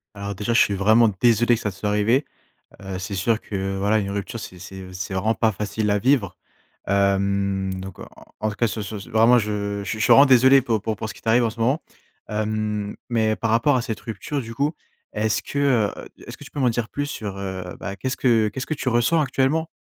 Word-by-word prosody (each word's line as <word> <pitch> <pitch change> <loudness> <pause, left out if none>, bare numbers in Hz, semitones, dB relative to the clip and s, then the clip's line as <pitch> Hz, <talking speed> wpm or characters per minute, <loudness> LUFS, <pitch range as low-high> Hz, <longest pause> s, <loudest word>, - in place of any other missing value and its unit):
Alors 100 0 -5
déjà, 105 +4 -2
je - - +5
suis 100 - +4
vraiment 110 +4 +4
désolé 120 0 +4
que - - -6
ça 105 - -1
te - - -15
soit 105 +2 -2
arrivé. 110 +7 +2 0.6
Heu, 95 -1 -5
c'est 95 +2 -5
sûr 110 +4 +1
que, 95 -1 -4
voilà, 105 +3 +2
une 100 -2 -2
rupture, 100 +3 -4
c'est 90 - -9
c'est 95 0 -10
c'est 90 +2 -5
vraiment 110 +4 +1
pas 110 -1 +1
facile 105 +2 -2
à 100 - +2
vivre. 110 - +1 0.5
Hem, 100 0 +1
donc 95 0 -8
en - - -8
en - - -15 0.2
en 110 - 0
tout 105 - -8
cas 115 - +2
sur, 110 0 -3
ce 105 +1 -6
ce 100 - -11
vraiment 115 +3 +5
je 100 -2 -2
je 110 +3 -4
suis 110 - +4
vraiment 140 - +8
désolé 130 +1 +6
pour 115 -4 0
pour 110 -1 -2
pour 110 - -5
ce - - -7
qui - - -15
t'arrive 115 +2 +3
en 115 - +1
ce 115 +1 -11
moment, 130 +7 +1 0.5
hem, 105 -1 -2
mais 110 -2 +1
par 115 - -2
rapport 115 +5 +3
à 125 - 0
cette 115 -4 -4
rupture 115 +6 -4
du 115 -2 -8
coup. 145 +5 0 0.4
Est-ce 105 -1 0
que 140 - -5
heu, 125 -7 +3 0.4
est-ce - - -8
que - - -15
tu - - -12
peux - - -8
m'en 130 -3 +3
dire 115 -1 -2
plus 145 0 -3
sur, 105 -8 -5 0.4
bah, 100 - -5
qu'est-ce 130 +3 -3
que 115 -4 +3
qu'est-ce 130 +5 -5
que 155 - -2
tu 135 - -3
ressens 120 +7 +2
actuellement? 150 +3 +1
110 Hz, 240 wpm, -23 LUFS, 100-120 Hz, 0.6 s, vraiment